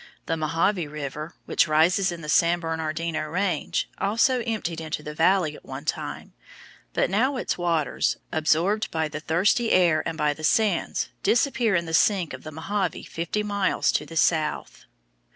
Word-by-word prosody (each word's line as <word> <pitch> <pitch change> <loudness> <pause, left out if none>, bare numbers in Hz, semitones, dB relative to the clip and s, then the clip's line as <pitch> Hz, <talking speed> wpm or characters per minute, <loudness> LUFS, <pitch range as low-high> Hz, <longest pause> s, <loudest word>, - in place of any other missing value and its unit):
The 165 - -1
Mohave 165 +1 0
River, 150 +2 -6
which - - +2
rises 175 +5 +3
in 170 -1 -7
the 150 - -8
San 170 +3 +3
Bernardino 160 -1 -3
Range, 185 +3 -1
also 230 +5 +2
emptied 175 -8 -2
into 155 -1 -4
the 150 - -6
valley 165 -1 +2
at - - -14
one - - -8
time, - - -4 0.6
but - - +2
now 255 +8 +2
its - - -1
waters, 170 -4 0
absorbed 165 +7 +1
by 160 -1 -1
the 150 0 -6
thirsty 185 +9 +2
air 170 -4 +4
and 165 - -6
by 150 -1 +1
the 155 - -12
sands, 215 +6 +1
disappear 240 -4 +2
in 170 -1 +1
the 160 - -6
sink 180 -1 +2
of - - -8
the 155 - -8
Mohave 190 +4 -3
fifty 170 +6 -2
miles 200 -2 +1
to - - 0
the 165 - -7
south. 155 -1 0
165 Hz, 170 wpm, -25 LUFS, 155-195 Hz, 0.6 s, air